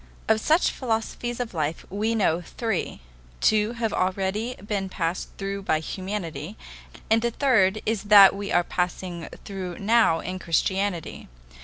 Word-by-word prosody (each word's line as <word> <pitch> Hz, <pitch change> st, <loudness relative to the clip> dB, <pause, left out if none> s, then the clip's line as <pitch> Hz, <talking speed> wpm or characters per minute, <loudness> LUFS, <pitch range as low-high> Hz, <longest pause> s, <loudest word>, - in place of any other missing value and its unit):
Of 220 Hz, 0 st, +3 dB
such 320 Hz, +8 st, +3 dB
philosophies 240 Hz, 0 st, -3 dB
of 245 Hz, -4 st, -4 dB
life 155 Hz, -1 st, -2 dB
we 215 Hz, +3 st, 0 dB
know 180 Hz, -6 st, +2 dB
three; 220 Hz, -, -3 dB, 0.4 s
two 215 Hz, +1 st, +2 dB
have 230 Hz, -3 st, -2 dB
already 195 Hz, +6 st, -1 dB
been 200 Hz, -1 st, -3 dB
passed 170 Hz, -1 st, -2 dB
through 200 Hz, 0 st, -4 dB
by 155 Hz, -5 st, +1 dB
humanity, 185 Hz, +1 st, -5 dB, 0.5 s
and 225 Hz, 0 st, +5 dB
the 235 Hz, -, +1 dB
third 220 Hz, -6 st, +2 dB
is 220 Hz, -2 st, 0 dB
that 205 Hz, -2 st, +8 dB
we 200 Hz, 0 st, -5 dB
are 175 Hz, -, +3 dB
passing 180 Hz, -1 st, -3 dB, 0.2 s
through 185 Hz, -3 st, -5 dB
now 215 Hz, -5 st, +3 dB
in 185 Hz, +2 st, -5 dB
Christianity. 185 Hz, +1 st, -1 dB
200 Hz, 145 wpm, -25 LUFS, 180-220 Hz, 0.5 s, that